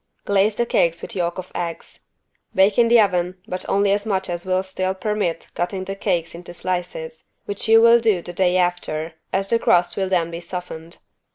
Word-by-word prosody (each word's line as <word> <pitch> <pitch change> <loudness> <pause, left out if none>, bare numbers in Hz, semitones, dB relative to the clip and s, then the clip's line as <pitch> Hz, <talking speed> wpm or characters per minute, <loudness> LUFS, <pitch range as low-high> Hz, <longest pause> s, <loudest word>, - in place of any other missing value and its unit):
Glaze 200 +1 +2
the 235 - +1
cakes 170 -6 +1
with - - -7
yolk 175 -2 -1
of 185 0 -7
eggs. 170 -1 -5 0.6
Bake 195 +3 +4
in 235 - +6
the 235 0 +6
oven, 180 -3 +1
but 185 -2 -4
only 200 0 +2
as 205 +1 +1
much 190 -4 -2
as 175 +1 -5
will 185 0 +1
still 190 0 -2
permit 205 -5 -2
cutting 185 +2 -2
the 195 +1 -5
cakes 175 -4 -1
into 175 +1 -9
slices, 175 -3 -4 0.2
which 205 +1 -4
you 225 0 +7
will 235 0 +7
do 215 -7 +1
the 175 - -7
day 180 0 +2
after, 175 -3 -1 0.2
as 195 +1 0
the 230 - +3
crust 175 -3 +2
will 190 -1 0
then 170 -3 +1
be 170 - -5
softened. 175 -2 -7
185 Hz, 200 wpm, -22 LUFS, 175-200 Hz, 0.6 s, you